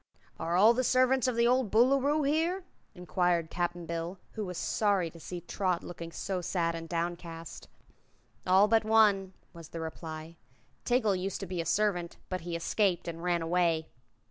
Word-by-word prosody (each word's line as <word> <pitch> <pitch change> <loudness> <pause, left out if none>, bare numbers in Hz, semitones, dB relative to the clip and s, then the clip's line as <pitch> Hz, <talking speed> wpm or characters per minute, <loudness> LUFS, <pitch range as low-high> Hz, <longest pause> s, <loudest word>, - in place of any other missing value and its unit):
"Are 165 +1 -1
all 210 +6 +7
the 255 +2 0
servants 255 +1 +3
of 250 - 0
the 235 0 +3
old 250 -2 +3
Boolooroo 275 +7 +3
here?" 330 +6 +1 0.3
inquired 175 -2 0
Cap'n 175 -1 -2
Bill, 170 +3 -4
who 215 - -4
was 180 -1 -5
sorry 200 -6 +1
to 165 - -13
see 175 +2 -7
Trot 180 0 -1
looking 170 -1 -8
so 185 +1 -3
sad 170 -1 0
and 165 0 -7
downcast. 170 -1 -5 0.8
"All 190 +3 +6
but 225 0 +3
one," 210 -4 +3 0.2
was 165 -3 -11
the 165 - -6
reply. 160 0 -7 0.5
"Tiggle 220 -6 +2
used 195 +1 -3
to - - -3
be 180 -2 -3
a 165 - -5
servant, 180 -3 0
but 185 0 -3
he 170 0 -4
escaped 180 +2 0
and 165 -1 -5
ran 175 -1 0
away." 165 -1 +1
180 Hz, 170 wpm, -30 LUFS, 170-215 Hz, 0.8 s, all